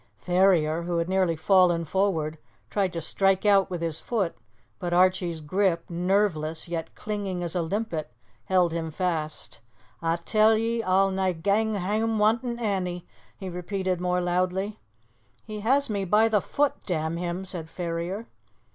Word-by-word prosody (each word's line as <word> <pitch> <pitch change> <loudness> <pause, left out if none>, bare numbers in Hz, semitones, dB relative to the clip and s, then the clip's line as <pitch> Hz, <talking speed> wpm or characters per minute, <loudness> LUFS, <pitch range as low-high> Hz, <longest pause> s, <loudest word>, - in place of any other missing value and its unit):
Ferrier, 175 - +2
who 170 0 -2
had 170 0 0
nearly 185 -3 +1
fallen 175 0 +3
forward, 160 -4 0 0.3
tried 195 -3 +1
to 165 - -3
strike 195 +4 +3
out 200 -2 +4
with 175 -2 -4
his 160 -2 -1
foot, 205 -8 -1 0.4
but 175 -2 -3
Archie's 180 -2 +2
grip, 170 +2 0
nerveless 175 -3 0
yet 165 -1 -5
clinging 200 -4 -3
as 170 - -3
a 175 - +1
limpet, 165 - -3 0.3
held 180 -2 +3
him 165 -1 -2
fast. 155 -6 -3 0.4
"A' 165 0 +1
tell 215 +5 +3
ye, 230 +1 0
a'll 195 -1 +3
nae 190 -1 0
gang 205 +6 +1
hame 215 +4 0
wantin' 235 +3 +1
Annie!" 185 -6 -2 0.3
he 190 - -7
repeated 185 0 -2
more 180 0 +1
loudly. 185 +4 -1 0.6
"He 215 -1 -7
has 265 +7 +2
me 205 -3 -2
by 210 +4 +4
the 210 -3 +2
foot, 290 +7 +1
damn 160 -2 -1
him!" 175 +2 -3
said 170 -4 -3
Ferrier. 175 +5 -4
185 Hz, 155 wpm, -26 LUFS, 170-205 Hz, 0.6 s, out